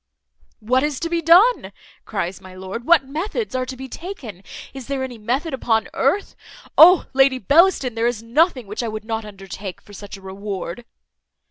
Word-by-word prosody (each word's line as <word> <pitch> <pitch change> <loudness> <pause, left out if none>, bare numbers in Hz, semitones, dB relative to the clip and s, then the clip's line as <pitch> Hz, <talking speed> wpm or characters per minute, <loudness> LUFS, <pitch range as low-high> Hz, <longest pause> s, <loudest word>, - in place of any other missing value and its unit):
"What 250 +4 +2
is 295 -2 -2
to 335 - -3
be 340 -1 0
done?" 365 +10 +5 0.3
cries 180 +3 -4
my 185 -1 -13
lord; 190 +6 -7
"what 335 -4 +5
methods 395 - -4
are 255 0 -2
to 260 - -7
be 265 +1 -7
taken? 260 - -8 0.3
Is 265 -3 -9
there 275 -1 -2
any 250 -3 -7
method 260 +9 -2
upon 225 -4 0
earth? 405 - 0 0.4
Oh! 355 +2 +8
Lady 270 0 +4
Bellaston! 285 - +3
there 230 +1 0
is 235 -2 -3
nothing 260 +1 +1
which 210 +4 -5
I 235 - -3
would 215 -1 -6
not 225 -1 -3
undertake 195 -1 -8
for 205 - -17
such 205 +1 -9
a - - -16
reward." 195 +2 -6
245 Hz, 185 wpm, -21 LUFS, 210-300 Hz, 0.4 s, Oh